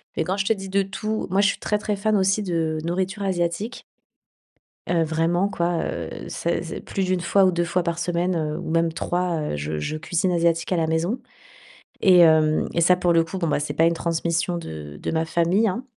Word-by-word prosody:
mais - - 0
quand 190 +2 -2
je 195 - 0
te 225 - +3
dis 195 -2 -8
de 195 +1 +2
tout, 215 +3 -3
moi, 190 +3 +2
je 205 - +4
suis - - -3
très 210 - 0
très 210 0 -2
fan 215 +2 +1
aussi 195 +2 +2
de 165 -4 -1
nourriture 190 +4 -2
asiatique 185 +4 -2 1.1
heu, 170 -1 +2
vraiment, 165 +4 +1
quoi, 170 -3 -1
heu, - - -4 0.2
c'est - - -2
c'est - - -6
plus 195 - -3
d'1 185 -1 0
fois 195 +3 +3
ou 185 - +5
2 175 -1 0
fois 175 +1 0
par 170 -1 -2
semaine, 175 +1 0
heu, 155 -1 -2
ou 175 - -6
même 165 0 +2
3, 175 0 -1
heu, 150 - -3
je 75 +1 -3
je 115 - -3
cuisine 175 +3 -1
asiatique 170 -1 +1
à - - +3
la 165 -1 +1
maison. 165 +9 0 0.8
Et, 185 -2 +6
hem, 160 -2 +5
et 170 - +2
ça, 180 +2 +5
pour 175 -1 +2
le 165 0 +4
coup, 175 +4 -6
bon, 170 - -1
bah, 145 - +1
c'est 150 - -3
pas 165 - +2
une 170 - +3
transmission 170 +1 -1
de 75 - -8
de - - -3
ma 160 0 0
famille, 170 +6 +2
hein. 220 +7 -3
175 Hz, 230 wpm, -23 LUFS, 165-190 Hz, 1.1 s, Et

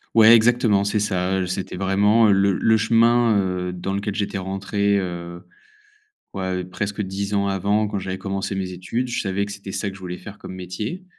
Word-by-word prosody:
Ouais, 115 0 +8
exactement, 115 -3 +3
c'est 105 +1 0
ça, 95 -2 0
heu, 90 - -1
c'était 95 +1 -4
vraiment, 100 +4 +3
heu, - - +5
le 95 0 +3
le 110 +4 +3
chemin, 115 +1 +3
heu, 90 -1 -2
dans 90 +2 -4
lequel 100 +1 -2
j'étais 100 0 -2
rentré, 100 +2 0
heu, 85 -2 -6 0.9
ouais, 95 -1 -2
presque 100 +3 -4
10 100 +1 -3
ans 100 0 +1
avant, 100 +2 +1
quand 105 - -3
j'avais 95 0 -4
commencé 95 0 -3
mes 95 -1 -3
études. 95 +8 -3
Je 120 - -2
savais 100 0 -1
que - - -7
c'était 100 -1 -8
ça 100 - -2
que 95 - -10
je - - -12
voulais 90 -1 -6
faire 105 0 -10
comme - - -9
métier. 95 - -5
100 Hz, 205 wpm, -22 LUFS, 95-105 Hz, 0.9 s, Ouais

